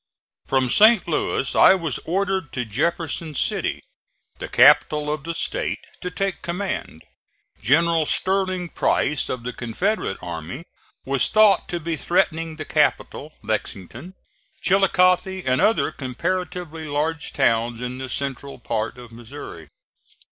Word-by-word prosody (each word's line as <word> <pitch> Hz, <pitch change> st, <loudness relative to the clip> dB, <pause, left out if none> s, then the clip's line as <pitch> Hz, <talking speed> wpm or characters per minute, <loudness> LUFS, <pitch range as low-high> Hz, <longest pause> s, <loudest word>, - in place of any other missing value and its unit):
From 130 Hz, -1 st, +1 dB
St. 215 Hz, -, +5 dB
Louis 150 Hz, -4 st, -1 dB
I -, -, +7 dB
was 165 Hz, -8 st, -3 dB
ordered 190 Hz, -2 st, -1 dB
to 125 Hz, -2 st, -2 dB
Jefferson 155 Hz, +6 st, -2 dB
City, -, -, -1 dB, 0.6 s
the -, -, -5 dB
capital 150 Hz, 0 st, +4 dB
of 150 Hz, -1 st, -6 dB
the 165 Hz, 0 st, -4 dB
State, -, -, -1 dB, 0.2 s
to 180 Hz, -, -3 dB
take 195 Hz, +2 st, -3 dB
command. 175 Hz, -, -4 dB, 0.6 s
General 160 Hz, +5 st, +3 dB
Sterling 185 Hz, -2 st, 0 dB
Price, 150 Hz, -3 st, 0 dB
of 125 Hz, -2 st, -4 dB
the 125 Hz, +1 st, -4 dB
Confederate 125 Hz, -, -2 dB
army, 85 Hz, -, -7 dB, 0.4 s
was 135 Hz, -1 st, +2 dB
thought 215 Hz, -2 st, +4 dB
to 175 Hz, -, -2 dB
be 165 Hz, 0 st, -3 dB
threatening 165 Hz, -2 st, 0 dB
the 155 Hz, -1 st, -6 dB
capital, 150 Hz, 0 st, 0 dB
Lexington, 110 Hz, -, -5 dB, 0.5 s
Chillicothe 190 Hz, -1 st, +3 dB
and 130 Hz, 0 st, +2 dB
other 220 Hz, +2 st, +2 dB
comparatively 165 Hz, +4 st, -4 dB
large 150 Hz, +2 st, -2 dB
towns 115 Hz, -3 st, +1 dB
in 125 Hz, +1 st, -5 dB
the 130 Hz, -1 st, -6 dB
central 140 Hz, +1 st, -4 dB
part 115 Hz, -1 st, -3 dB
of 120 Hz, -2 st, -12 dB
Missouri. 115 Hz, -, -10 dB
155 Hz, 130 wpm, -22 LUFS, 125-180 Hz, 0.6 s, I